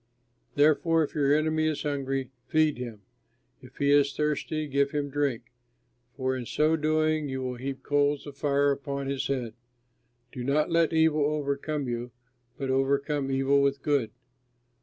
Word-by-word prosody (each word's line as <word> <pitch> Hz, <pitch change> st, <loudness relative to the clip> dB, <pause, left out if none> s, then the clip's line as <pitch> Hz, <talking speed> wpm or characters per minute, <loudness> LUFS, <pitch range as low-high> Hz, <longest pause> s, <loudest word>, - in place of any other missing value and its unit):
Therefore, 155 Hz, +2 st, +3 dB
if 150 Hz, -, -5 dB
your 140 Hz, -2 st, +2 dB
enemy 155 Hz, +1 st, +2 dB
is 155 Hz, -2 st, -2 dB
hungry, 135 Hz, -3 st, -2 dB, 0.2 s
feed 155 Hz, -4 st, +2 dB
him; 115 Hz, -5 st, -7 dB, 0.6 s
if 125 Hz, -1 st, -16 dB
he 140 Hz, 0 st, +2 dB
is 140 Hz, -1 st, +4 dB
thirsty, 150 Hz, 0 st, -1 dB
give 140 Hz, 0 st, +1 dB
him 145 Hz, -1 st, -3 dB
drink, 135 Hz, -5 st, -2 dB, 0.7 s
for 130 Hz, -1 st, 0 dB
in 125 Hz, -3 st, -5 dB
so 155 Hz, +1 st, +2 dB
doing 155 Hz, -1 st, +1 dB
you 130 Hz, 0 st, -3 dB
will 125 Hz, -1 st, -4 dB
heap 135 Hz, +2 st, -5 dB
coals 145 Hz, 0 st, +1 dB
of 145 Hz, -2 st, -9 dB
fire 140 Hz, 0 st, +2 dB
upon 140 Hz, 0 st, -3 dB
his 135 Hz, 0 st, -2 dB
head. 125 Hz, -5 st, -2 dB, 0.8 s
Do 125 Hz, -, -6 dB
not 150 Hz, +5 st, +1 dB
let 165 Hz, -1 st, +3 dB
evil 160 Hz, -2 st, +3 dB
overcome 145 Hz, -1 st, -2 dB
you, 120 Hz, 0 st, -3 dB, 0.5 s
but 135 Hz, -1 st, -2 dB
overcome 140 Hz, +1 st, 0 dB
evil 135 Hz, +1 st, +2 dB
with 140 Hz, 0 st, 0 dB
good. 140 Hz, -7 st, +1 dB
140 Hz, 160 wpm, -27 LUFS, 135-150 Hz, 0.8 s, is